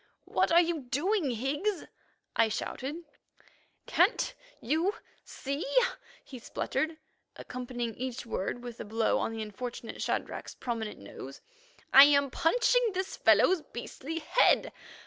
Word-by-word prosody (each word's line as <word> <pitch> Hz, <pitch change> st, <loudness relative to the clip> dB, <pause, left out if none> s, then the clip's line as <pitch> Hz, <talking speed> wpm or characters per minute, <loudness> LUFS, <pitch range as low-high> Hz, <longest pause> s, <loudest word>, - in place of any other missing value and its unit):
"What -, -, +1 dB
are 340 Hz, -, +7 dB
you 340 Hz, -2 st, -1 dB
doing, 305 Hz, -, 0 dB
Higgs?" 290 Hz, -, -1 dB, 0.5 s
I 230 Hz, -1 st, +4 dB
shouted. 280 Hz, +9 st, -4 dB, 0.8 s
"Can't—you—see," 325 Hz, -, -1 dB, 0.6 s
he 255 Hz, -, -10 dB
spluttered, 315 Hz, +6 st, -2 dB, 0.4 s
accompanying 245 Hz, -2 st, -5 dB
each 255 Hz, +1 st, -5 dB
word 230 Hz, +2 st, -3 dB
with 240 Hz, -2 st, -8 dB
a -, -, -4 dB
blow 220 Hz, +1 st, +1 dB
on -, -, -1 dB
the 225 Hz, -1 st, -4 dB
unfortunate 235 Hz, +2 st, -6 dB
Shadrach's -, -, -3 dB
prominent 225 Hz, -3 st, -4 dB
nose. 130 Hz, +7 st, -10 dB, 0.5 s
"I 275 Hz, +1 st, +12 dB
am 280 Hz, -2 st, +3 dB
punching 485 Hz, -, +2 dB
this 375 Hz, +1 st, -2 dB
fellow's 370 Hz, -3 st, +4 dB
beastly 280 Hz, +5 st, -7 dB
head. 330 Hz, +9 st, +3 dB
270 Hz, 115 wpm, -30 LUFS, 235-330 Hz, 0.8 s, I